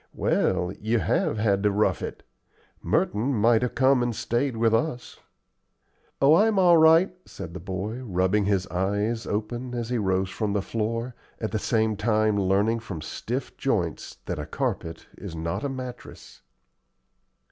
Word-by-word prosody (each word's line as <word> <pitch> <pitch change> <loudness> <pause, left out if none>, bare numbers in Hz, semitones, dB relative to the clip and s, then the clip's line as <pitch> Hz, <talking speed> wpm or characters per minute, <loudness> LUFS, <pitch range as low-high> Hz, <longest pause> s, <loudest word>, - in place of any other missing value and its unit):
Well, 90 0 +1
you 110 +3 +1
HAVE 105 +2 0
had 100 -2 +1
to 105 - +3
rough 105 +1 +1
it. - - -6 0.6
Merton 120 +7 0
might 115 +1 +4
have 125 - -2
come 130 0 +4
and 120 -2 -1
stayed 120 +2 -1
with 115 0 +2
us." 125 +1 -2 1.0
"Oh, 140 +2 +6
I'm 210 +4 +4
all 175 -3 +6
right," 160 +4 +5
said 80 - -8
the 90 - -6
boy, 95 +7 -4
rubbing 95 -1 +1
his 100 -2 +1
eyes 100 +5 -1
open 120 +4 -3
as 120 -1 -3
he 125 - +1
rose 95 -2 0
from 105 -3 -2
the 100 -2 0
floor, 115 +3 -2 0.3
at 110 - -3
the 110 - -1
same 110 0 +1
time 110 0 +1
learning 100 +4 +2
from 105 -7 -7
stiff 120 - -5
joints 90 - -2
that - - -4
a - - -5
carpet 80 0 -3
is 80 - -7
not 80 - -3
a 140 - -1
mattress. 130 -2 -9
110 Hz, 160 wpm, -25 LUFS, 100-125 Hz, 1.0 s, Oh